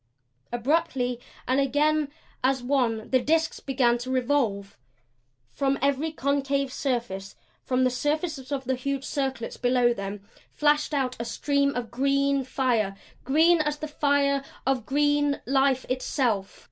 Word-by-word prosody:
Abruptly, 250 -1 0 0.3
and 260 +2 +2
again 290 +2 +2 0.3
as 260 -1 +2
one, 245 -5 0
the 260 - +5
disks 320 +4 +1
began 245 -3 +1
to 250 +2 -6
revolve. 245 -7 0 0.8
From 275 0 0
every 280 +3 +1
concave 280 -2 0
surface, 235 -8 -3 0.3
from 255 0 0
the 255 - +3
surfaces 295 +1 -2
of 275 -2 -2
the 260 - +1
huge 275 +1 -2
circlets 265 -5 -3
below 245 -1 +3
them, 200 -1 -6 0.2
flashed 295 0 +1
out 255 -2 0
a 235 - -3
stream 280 +3 0
of 240 -2 -4
green 275 +2 +1
fire 240 -7 0 0.3
green 320 +5 +4
as 300 -1 -1
the 310 - -5
fire 285 -2 +1 0.2
of 260 -4 0
green 290 0 +2
life 270 0 +2
itself. 250 -6 -1
270 Hz, 135 wpm, -26 LUFS, 245-285 Hz, 0.8 s, the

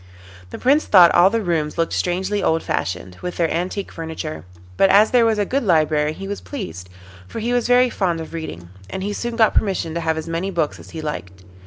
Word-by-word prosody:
The - - -7
Prince 285 +4 +2
thought 180 -4 +7
all 175 +2 +6
the 225 +1 -1
rooms 160 -4 -1
looked 165 0 0
strangely 190 +3 -1
old 165 0 +1
fashioned, 90 0 -3
with 180 0 -5
their 170 -2 +1
antique 185 +4 -3
furniture, 160 - -6 0.3
but 195 - +4
as 205 +3 +5
there 240 -2 +4
was 220 -1 +1
a 205 - +1
good 275 +7 -1
library 155 -5 +2
he 195 +4 -8
was 205 0 -5
pleased, 180 - -7 0.4
for - - -6
he 235 +2 -1
was 245 -1 +1
very 245 0 +4
fond 175 -4 -1
of 160 - -8
reading, 85 - -7 0.2
and 190 - -5
he 205 +1 -2
soon 235 +2 -4
got 225 -2 +4
permission 185 -5 0
to 170 - -2
have 160 -1 0
as 160 0 -5
many 165 +3 -2
books 165 -5 -2
as - - -13
he 160 - -7
liked. 95 -10 -6
175 Hz, 225 wpm, -21 LUFS, 160-205 Hz, 0.4 s, thought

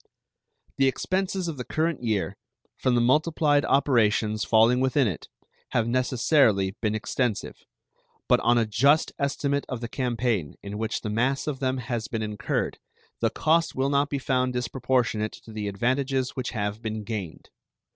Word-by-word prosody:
The 135 - +4
expenses 185 +6 -1
of 160 -4 -4
the 125 - -4
current 160 +2 -1
year, 105 -4 -1 0.4
from 130 -1 +1
the 120 - +3
multiplied 145 +3 +3
operations 110 -5 +2
falling 115 +3 +4
within 130 0 +2
it, 90 - -5 0.4
have 115 -1 +2
necessarily 120 -5 +2
been 110 -1 0
extensive; 115 0 -3 0.6
but - - +4
on 120 0 +3
a 115 - +3
just 135 +9 +3
estimate 140 0 0
of 130 - -3
the 120 - -4
campaign 120 - -1
in 100 +1 -6
which 110 0 -2
the 105 - -4
mass 125 +5 0
of 145 -4 -3
them 130 -1 0
has 120 -2 -3
been 115 -2 -3
incurred 105 -1 -2 0.4
the - - +2
cost 165 +2 +1
will 135 +1 +1
not 140 +1 +2
be 140 - -1
found 130 -1 0
disproportionate 125 -3 0
to 115 - -13
the 105 -1 -4
advantages 130 +5 0
which 130 -2 -4
have 105 -1 -3
been 110 -1 -4
gained. 100 -7 -6
125 Hz, 160 wpm, -26 LUFS, 110-135 Hz, 0.6 s, The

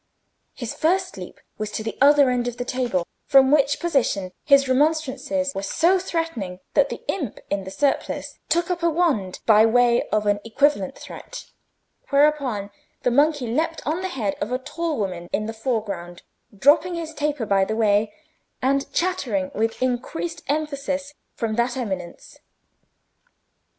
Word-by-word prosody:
His 240 -4 -5
first 370 +3 0
leap - - -9 0.2
was 215 -1 -2
to 220 - -3
the 225 - -4
other 285 -2 +6
end 245 -1 0
of 245 0 -4
the 245 - -3
table, 240 -9 -1 0.2
from 270 -2 +6
which 285 -1 +3
position 250 - 0
his 275 -2 +5
remonstrances 280 0 0
were 195 - -3
so 340 - +2
threatening 325 - -3
that 280 -1 +3
the - - -7
imp 285 - -3
in 200 -1 -1
the - - -6
surplice 280 +8 -1
took 345 +2 +1
up 350 -1 -2
a 340 - +3
wand 300 - 0
by 215 -1 +6
way 240 +1 +4
of 215 0 0
an 205 0 +2
equivalent 230 -4 +1
threat, - - -9 0.6
whereupon 280 -8 +2 0.3
the 250 - +2
monkey 290 +1 +3
leaped 320 +8 -1
on 310 +3 0
to - - -5
the 375 - -2
head 225 - -2
of 220 - -2
a 250 - +1
tall 315 +4 -3
woman 180 -4 -3
in 215 - -1
the 225 - -4
foreground, 215 -7 -3 0.3
dropping 310 - +4
his 325 -1 -5
taper 295 -5 -1
by 195 -2 +3
the 220 +3 -2
way, 210 -1 +2 0.5
and 275 +2 0
chattering 255 - -1
with 225 +3 -1
increased 305 +6 -2
emphasis 285 -1 -2 0.2
from 225 -2 -2
that 240 +1 0
eminence. 190 -8 -6
265 Hz, 160 wpm, -23 LUFS, 220-300 Hz, 0.6 s, other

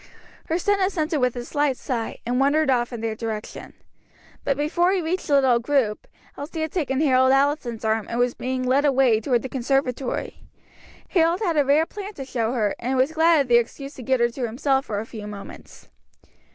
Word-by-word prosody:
Her 325 - 0
son 405 +3 +1
assented 335 -5 0
with 250 -1 +1
a 240 -1 -5
slight 290 -2 0
sigh, 235 -4 -4
and 245 +2 0
wandered 285 +1 +3
off 240 -1 +1
in 235 -2 -6
their 225 -1 -2
direction. 220 -1 -6 0.7
But 275 - 0
before 345 +5 +1
he 385 - +1
reached 355 +2 -2
the 285 - +3
little 260 -4 +4
group, 240 -4 0 0.3
Elsie 315 +3 -6
had 315 -1 -2
taken 275 -7 -1
Harold 260 -3 +4
Allison's 270 -5 +1
arm 220 -1 0
and 235 - -3
was 245 0 +2
being 255 0 -3
led 260 +3 +2
away 265 -6 +3
toward 240 0 +1
the - - -3
conservatory. 265 0 -2 0.7
Harold 340 +1 +2
had 350 -6 0
a 295 - +4
rare 290 +4 +3
plant 410 +2 -8
to 270 - -6
show 235 -3 -1
her, 215 -5 0
and 260 +2 -1
was 260 +4 +2
glad 320 -1 +4
of 275 - -2
the 240 -1 +5
excuse 275 +4 -3
to 260 - -10
get 260 +1 +1
her 235 0 +3
to 245 0 -4
himself 270 +3 0
for 205 -2 -2
a 215 - -5
few 215 -3 -8
moments. 205 -1 -11
265 Hz, 205 wpm, -23 LUFS, 240-300 Hz, 0.7 s, the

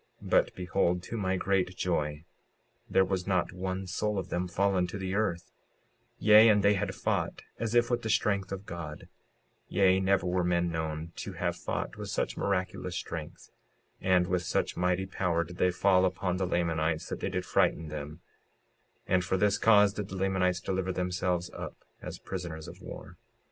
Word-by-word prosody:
56:56 - - -8
But - - +3
behold, 90 -1 0
to 115 - -6
my 95 -3 0
great 95 -1 0
joy, 75 -3 -1 0.6
there 95 - +4
had 95 -1 -2
not 95 -2 +1
one 95 +1 -3
soul 105 +3 -1
of 95 -1 -3
them 90 +1 -1
fallen 95 0 +1
to 95 - -6
the 95 -1 -3
earth; 95 -5 -1 0.7
yea, 110 +1 +7
and 105 -2 +4
they 100 0 +5
had 100 - -2
fought - - -1 0.2
as 115 +1 -1
if 120 +1 +4
with 120 0 +1
the 110 - -4
strength 100 -3 +1
of 95 0 -5
God; 80 -4 -7 0.6
yea, 95 -1 +4
never 95 0 +2
were 90 0 +1
men 85 0 +1
known 80 0 -3
to 95 - -5
have 85 0 -1
fought - - -4
with - - -6
such - - -1
miraculous 90 -2 -2
strength; 80 -3 -6 0.5
and 90 -1 +3
with 90 0 0
such 90 - -1
mighty 90 +1 +1
power 90 -3 0
did 90 +2 -11
they 90 - +3
fall 90 +1 +3
upon 90 -1 0
the 95 -1 0
Lamanites, 80 -2 0
that - - -4
they - - -2
did - - -2
frighten 80 -2 +1
them; 75 +2 -7 0.8
and 95 0 +2
for 95 +1 0
this 105 +1 +2
cause 105 -2 +6
did 105 -2 -4
the 95 - -7
Lamanites 95 -2 +1
deliver 95 0 -1
themselves 90 -1 -1
up - - -7 0.2
as - - -6
prisoners 85 -4 -6
of - - -11
war. - - -9
90 Hz, 185 wpm, -30 LUFS, 85-95 Hz, 0.8 s, yea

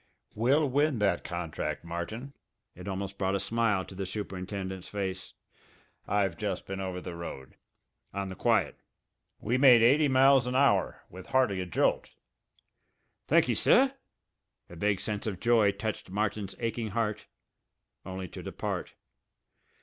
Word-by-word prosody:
"We'll 135 +7 +3
win 145 +1 +2
that 100 -4 +1
contract, 85 -2 -4
Martin!" 100 +11 -5 0.4
It - - -10
almost 100 0 -4
brought 95 0 +1
a - - 0
smile 105 -1 +1
to - - -11
the 95 0 -4
superintendent's 95 -1 -5
face. 95 -3 -4 0.7
"I've 100 -4 +1
just 100 -4 -3
been 95 0 -5
over 95 -1 -3
the 90 -1 -7
road 75 -6 -8 0.6
on 100 0 -3
the 95 - -7
quiet. - - +1 0.6
We 120 +4 0
made 125 -4 +7
eighty 145 +6 +5
miles 135 -1 +5
an 125 - -2
hour 130 -9 +2
with 95 +1 -10
hardly 125 -8 +2
a 90 - -4
jolt!" 85 - +1 1.2
"Thankee, - - +4
sir." 265 +2 +4 0.8
A - - -9
vague 100 +3 0
sense 105 0 -3
of 95 -4 -3
joy 115 -3 +4
touched 100 0 -5
Martin's 100 0 -2
aching 115 -1 -2
heart 110 -2 -1 0.8
only 95 0 -6
to - - -8
depart. - - -4
100 Hz, 140 wpm, -29 LUFS, 95-115 Hz, 1.2 s, made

